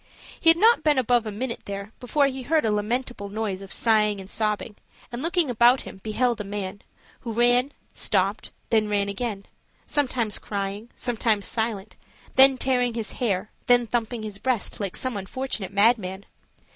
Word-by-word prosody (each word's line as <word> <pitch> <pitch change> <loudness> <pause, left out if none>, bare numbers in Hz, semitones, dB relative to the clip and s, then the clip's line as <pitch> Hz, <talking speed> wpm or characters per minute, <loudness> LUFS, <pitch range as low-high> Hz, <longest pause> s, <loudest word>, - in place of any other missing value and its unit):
He 330 - +5
had 330 - +6
not 450 +3 +5
been 300 -3 +3
above 245 -2 +2
a - - -3
minute 235 +3 -3
there 200 +1 -6
before 280 +4 +2
he 265 -1 -2
heard 310 +3 +1
a 220 - +2
lamentable 210 0 -2
noise 205 -2 -3
of 195 - -10
sighing 210 -3 +3
and 190 0 -10
sobbing; 210 -1 -2 0.4
and 240 +1 -5
looking 335 0 +1
about 245 +1 +4
him, - - -10
beheld 230 +1 0
a - - -4
man, 200 -1 -5 0.4
who 230 - -6
ran, 245 +4 +3 0.2
stopped, - - 0 0.2
then 220 -2 +3
ran 200 -1 0
again, 200 -1 -4 0.4
sometimes 250 -7 0
crying, 200 +2 -4
sometimes 220 -4 0
silent, 220 -2 -3 0.4
then 265 0 +7
tearing 250 -2 +1
his 225 -2 -3
hair, 215 -4 -2 0.2
then 245 -1 +5
thumping 230 0 -2
his 210 -2 -7
breast 250 -2 -1
like 200 -3 -3
some 255 -3 -2
unfortunate 205 +1 -4
madman. 200 -2 +2
225 Hz, 170 wpm, -25 LUFS, 205-250 Hz, 0.4 s, then